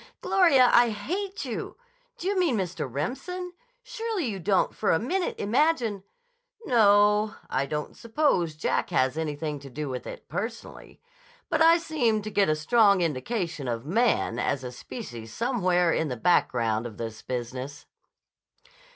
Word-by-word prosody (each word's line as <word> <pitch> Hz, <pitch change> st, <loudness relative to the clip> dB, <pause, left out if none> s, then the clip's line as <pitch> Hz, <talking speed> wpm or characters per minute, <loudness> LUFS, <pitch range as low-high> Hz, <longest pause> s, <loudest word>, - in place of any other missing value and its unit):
"Gloria, 275 Hz, -10 st, +4 dB
I 240 Hz, 0 st, +6 dB
hate 365 Hz, -, -4 dB
you! -, -, -5 dB, 0.4 s
D' -, -, -9 dB
you 395 Hz, +2 st, 0 dB
mean 325 Hz, -11 st, +2 dB
Mr. 180 Hz, -8 st, -3 dB
Remsen? 345 Hz, -, -4 dB, 0.3 s
Surely 455 Hz, -, -3 dB
you 205 Hz, -5 st, -3 dB
don't 190 Hz, +2 st, +1 dB
for 215 Hz, -, -1 dB
a -, -, +4 dB
minute 350 Hz, -, -1 dB
imagine—" 230 Hz, -3 st, +1 dB, 0.6 s
"No; 210 Hz, -2 st, +4 dB, 0.2 s
I 135 Hz, +1 st, 0 dB
don't 150 Hz, +1 st, -4 dB
suppose 225 Hz, -, 0 dB
Jack 155 Hz, -, -1 dB
has 130 Hz, +1 st, +1 dB
anything 150 Hz, -1 st, -3 dB
to 140 Hz, 0 st, -11 dB
do 145 Hz, +2 st, -5 dB
with 125 Hz, -1 st, -5 dB
it, -, -, -9 dB
personally. 230 Hz, +2 st, -6 dB, 0.5 s
But 320 Hz, -2 st, +1 dB
I 330 Hz, +1 st, +7 dB
seem 245 Hz, -11 st, 0 dB
to 215 Hz, -, -5 dB
get 200 Hz, -4 st, +2 dB
a 155 Hz, -, +3 dB
strong 200 Hz, +4 st, +4 dB
indication 165 Hz, -, -2 dB
of 120 Hz, 0 st, -3 dB
Man 195 Hz, -, +1 dB
as 135 Hz, +1 st, -1 dB
a 125 Hz, -, -5 dB
species 120 Hz, -, -8 dB
somewhere 185 Hz, -8 st, +1 dB
in 160 Hz, -, 0 dB
the 125 Hz, -3 st, -4 dB
background 115 Hz, -6 st, +1 dB
of 110 Hz, -, -11 dB
this 110 Hz, -1 st, -6 dB
business." 130 Hz, +3 st, -5 dB
200 Hz, 150 wpm, -26 LUFS, -, 0.6 s, I